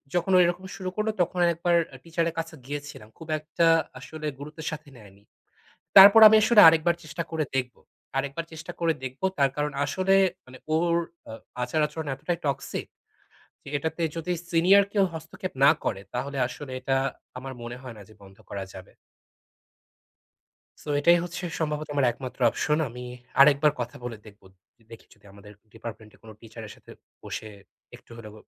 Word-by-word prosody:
যখন 175 +2 0
ও - - +7
এরকম 175 +2 -2
শুরু 185 -1 -4
করলো, 215 +1 0
তখন 175 +1 -1
একবার 170 +1 +1 0.2
আ - - -9
টিচারের 165 0 -1
কাছে 165 0 -5
গিয়েছিলাম। 145 -6 -7
খুব 160 - -11
একটা 165 +2 0 0.3
আসলে 155 -1 -7
গুরুত্বের 150 +2 -8
সাথে 155 -1 -8
নেয়নি। 100 -2 -17 0.8
তারপর 200 +3 +11
আমি 220 - +6
আসলে 220 0 +6
আরেকবার 165 +1 +3
চেষ্টা 155 +2 -4
করে 160 -2 -1
দেখবো 125 -2 -3 0.4
আরেকবার 140 +4 -3
চেষ্টা 160 0 -8
করে 165 -1 +2
দেখবো। 130 +7 -7
তার 140 -1 +3
কারণ, 150 -1 -1
আসলে 190 +4 +1 0.3
মানে 130 0 -13 0.2
ওর 170 +1 +2 0.3
আ - - -7 0.3
আচার-আচরণ 150 +4 -1
এতটাই 160 +5 -3
toxic 140 - -3 0.8
যে - - -17
এটাতে 160 +3 -4
যদি 165 +2 -3 0.2
সিনিয়র 185 +4 +5
কেউ 200 -2 +3
হস্তক্ষেপ 160 +3 -7
না 140 - +8
করে, 95 - -2
তাহলে 135 +3 -4
আসলে 130 +1 -9
এটা 135 +1 -1 0.4
আমার 130 +1 -7
মনে 120 +1 -7
হয় 125 -4 -9
না - - -11
যে - - -16
বন্ধ 95 0 -16
করা 100 -1 -5
যাবে। 95 -1 -12 1.9
সো - - -16
এটাই 170 +4 +5
হচ্ছে 175 +1 -6 0.2
সম্ভবত 150 -1 -2
আমার 140 - +3
একমাত্র 130 +2 -9
অপশন। 150 +6 0
আমি 125 +1 -9 0.4
আরেকবার 145 +1 +6
কথা 120 0 -4
বলে 120 -2 -5
দেখবো। 105 -2 -16 0.3
য - - -29
দেখি 115 - -12
যদি - - -27
আমাদের 100 +1 -14 0.2
ডিপার্টমেন্টে 110 -1 -10
কোনো 110 -1 -12
টিচারের 110 -1 -10
সাথে - - -17 0.3
বসে - - -6 0.5
একটু - - -20
হলেও 110 -2 -10
150 Hz, 165 wpm, -26 LUFS, 125-170 Hz, 1.9 s, তারপর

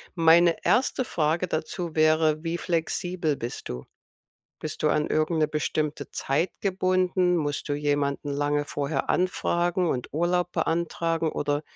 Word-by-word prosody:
Meine 165 0 +5
1. 255 0 +2
Frage 165 +1 0
dazu 165 +1 -3
wäre, 155 0 +3
wie 165 +1 -2
flexibel 170 -1 -1
bist 120 +1 -6
du? 60 +1 -6 0.7
Bist 155 - -5
du 150 - +4
an 150 0 +2
irgend 155 +1 +1
'ne 155 - +3
bestimmte 150 -1 -2
Zeit 140 +7 0
gebunden? 185 -2 +1
Musst 145 -1 -2
du - - +1
jemanden 145 -1 -1
lange 145 +1 0
vorher 140 -1 -2
anfragen 175 -1 +1
und 125 -5 -2
Urlaub 175 +2 +1
beantragen 165 -1 0
oder 145 0 -1
160 Hz, 140 wpm, -26 LUFS, 150-175 Hz, 0.7 s, Meine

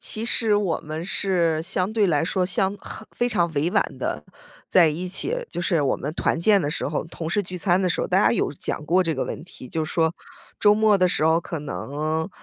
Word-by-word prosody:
其 220 +1 -4
实 225 -3 +2
我 195 -6 0
们 155 +2 -6
是 175 -5 0
相 185 +4 -1
对 215 -3 +2
来 155 -2 +1
说 185 +1 0
相 190 +1 +1
很 220 - -10
非 245 - 0
常 175 -7 +1
委 150 +4 +1
婉 - - +3 0.2
地 - - -3 0.4
在 175 -3 +5
一 170 +4 -3
起 340 - +2 0.2
就 175 - -4
是 170 -2 +1
我 135 - +1
们 150 +3 -5
团 - - 0
建 200 +3 +4
的 145 - -2
时 - - -2
候、 150 - -2
同 165 -1 -6
事 205 +3 +1
聚 180 0 -7
餐 180 +1 +2
的 185 - +1
时 - - -1
候， - - -1
大 - - +2
家 - - +4
有 - - 0
讲 150 - -4
过 180 +5 +3
这 165 - 0
个 - - -2
问 - - -6
题， 130 -7 -12
就 160 +3 -2
是 155 - -6
说 160 -1 +2 0.5
周 205 0 +5
末 215 -2 +3
的 180 - +4
时 155 - +1
候， 160 +1 +3
可 165 -2 -6
能， 155 +3 -3
175 Hz, 260 characters per minute, -23 LUFS, 160-195 Hz, 0.5 s, 在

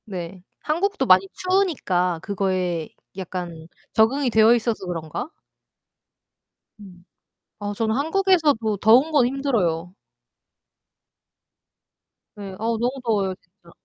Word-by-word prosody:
네. 180 -3 -7 0.2
한국도 335 -1 -1
많이 185 -3 +5
추우니까 285 - 0
그거에 185 -4 -2 0.3
약간 175 -3 -6 0.3
적응이 250 +5 +2
되어 220 0 +5
있어서 225 -4 -2
그런가? 165 - -5 1.5
음. 185 -4 -14 0.6
아 205 0 -4
저는 220 +1 0
한국에서도 305 - +1
더운 240 +10 +4
건 285 -5 +4
힘들어요. 200 - -1 2.4
네. 200 -2 -8
아우 225 +1 -1
너무 245 +2 +1
더워요, 200 -5 0
진짜. 180 -1 -23
210 Hz, 225 characters per minute, -23 LUFS, 180-265 Hz, 2.4 s, 많이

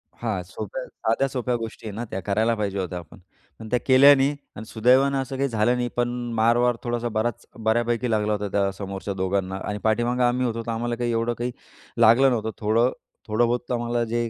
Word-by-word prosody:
हां, - - -2
सोप्या - - -6
साध्या 135 - -1
सोप्या 125 -2 -2
गोष्टी 115 -1 -6
आहेत 105 - -6
ना, 120 +3 -4
त्या 95 - -2
करायला 110 +4 +1
पाहिजे 100 -2 -2
होत्या 90 -1 -3
आपण 85 +2 -14 0.4
आणि 110 -1 -9
त्या 125 - +1
केल्या 135 +2 +8
नाही 135 +2 +1 0.2
आणि 110 - -8
सुदैवानं 130 +5 +3
असं 135 0 -5
काही 140 +1 0
झालं 115 +1 +2
नाही. 125 0 -1
पण 120 0 +1 0.3
मार 115 +2 +3
वार 120 0 +2
थोडासा 120 0 -2
बराच 115 +2 -2 0.2
बऱ्यापैकी 120 +1 +1
लागला 105 -1 +1
होता 105 0 -2
त्या 100 0 +1
समोरच्या 100 0 -5
दोघांना 95 0 -1
आणि 105 - -2
पाठीमागं 120 +3 +1
आम्ही 125 +1 +2
होतो. 115 -1 -2
तर 115 - -2
आम्हाला 120 +1 -2
काही 120 0 -1
एवढं 115 +1 0
काही 120 +1 -2 0.5
लागलं 115 +4 +6
नव्हतं. 110 -3 -1
थोडं 115 +4 +2 0.4
थोडंबहुत 120 +3 0
आम्हाला 120 0 0
जे 115 0 -1
115 Hz, 200 wpm, -24 LUFS, 110-125 Hz, 0.5 s, केल्या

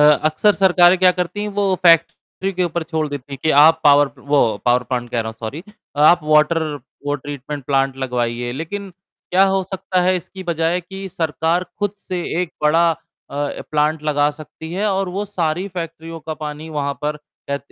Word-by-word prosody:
अक्सर 155 +6 +4
सरकारें 185 -2 +5
क्या 185 0 +6
करती 180 +3 -3
हैं, 210 - -2
वो 200 -2 0
फैक्ट्री 170 +3 +2
के 180 0 0
ऊपर 170 0 -2
छोड़ 160 -1 -2
देती 140 -1 -7
हैं 135 - -5
कि 155 - +2
आप 160 +1 +6
पावर 145 -1 +6
वो 145 +1 +1 0.3
पावर 125 0 +3
प्लांट 120 -1 -4
कह 120 - 0
रहा 110 - -4
हूँ, 110 - -7
सॉरी 135 +9 -5 0.4
आप 175 +2 +6
वाटर 155 +2 +3 0.4
वो 145 - +1
ट्रीटमेंट 145 0 -6
प्लांट 135 -1 +1
लगवाइए, 120 -2 -2
लेकिन 180 +9 -5 0.4
क्या 185 +2 +5
हो 195 0 +1
सकता 185 0 -2
है 185 +1 +3
इसकी 190 +2 -8
बजाय 170 +1 0
कि 195 +2 -8
सरकार 165 +1 -1
खुद 205 -1 -1
से 185 -3 -5 0.2
एक 180 -3 -3
बड़ा 165 +3 +4
अ, 160 - -2 0.7
प्लांट 150 +1 +1
लगा 145 -1 +2
सकती 155 +2 -10
है 200 +4 -1
और 190 -1 -1
वो 195 +3 -3
सारी 180 -2 -2
फैक्ट्रियों 165 -1 -6
का 155 +1 -5
पानी 150 +1 -6
वहाँ 140 -2 -2
पर 150 0 -1 0.3
कह 140 - 0
160 Hz, 185 wpm, -19 LUFS, 145-180 Hz, 0.7 s, क्या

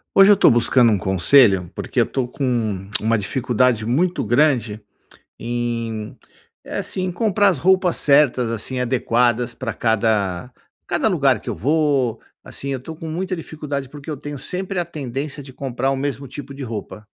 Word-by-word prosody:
Hoje 195 +1 +8
eu 205 - +6
tô - - +6
buscando 120 0 +4
um 105 - +2
conselho, 95 0 +4
porque - - -1
eu - - +3
tô 130 -3 -2
com 125 +3 -6
um 110 -7 -1
uma 115 +2 +2
dificuldade 120 +1 0
muito 170 +10 0
grande 120 -3 +1 0.6
em 115 -1 -4 0.5
eh, - - -5
assim, 185 - -4
em 185 - -2
comprar 205 +1 +2
as 180 -7 +1
roupas 185 +2 +3
certas, 140 -5 +3
assim, 115 +3 -3
adequadas 120 -1 +1
pra 120 -4 -4
cada 110 -2 0 0.3
cada - - +1
lugar - - +2
que - - -10
eu - - -2
vou, 140 - +1 0.2
assim, 140 - -6
eu 135 -2 -3
tô 160 +5 -8
com 165 0 -7
muita 185 +4 -3
dificuldade 150 -4 -5
porque 145 +2 -9
eu 150 - -3
tenho 145 +1 -7
sempre 185 +7 -4
a 175 - 0
tendência 145 -2 -5
de 135 - -12
comprar 135 0 -2
o 135 - 0
mesmo 140 0 -3
tipo 140 +2 -8
de 140 0 -8
roupa. 110 -2 -7
130 Hz, 180 wpm, -21 LUFS, 115-150 Hz, 0.6 s, Hoje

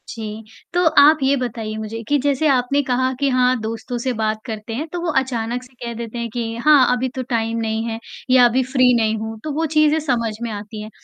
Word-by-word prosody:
जी, 220 -1 -6 0.3
तो 355 0 +2 0.2
आप 300 +2 +7
ये 270 +1 +3
बताइए 225 -4 -4
मुझे 220 +1 -5
कि 290 - +3
जैसे 285 +2 +1
आपने 275 +1 +2
कहा 255 0 0
कि 280 -1 +2
हाँ, 255 -1 +2
दोस्तों 225 +2 -4
से 250 +2 -2
बात 215 -1 -1
करते 220 -1 -6
हैं 295 +8 -3
तो 350 - -2
वो 345 -1 -1
अचानक 245 -1 -3
से 255 +1 -18
कह 235 0 -4
देते 235 0 -6
हैं 235 0 -3
कि 230 -2 -3
हाँ 290 -5 +6
अभी 255 +1 -2
तो 260 - -2
टाइम 230 -1 -1
नहीं 220 0 -1
है 225 -1 -4 0.3
या 255 -1 +7
अभी 250 +2 +2
फ्री 255 -1 +3
नहीं 220 -1 +1
हूँ, 220 0 -6
तो 310 - -3
वो 320 +3 0
चीज़ें 305 0 +3
समझ 240 -7 -1
में 235 - -3
आती 210 +1 -7
हैं। 215 - -8
245 Hz, 235 wpm, -20 LUFS, 225-265 Hz, 0.3 s, आप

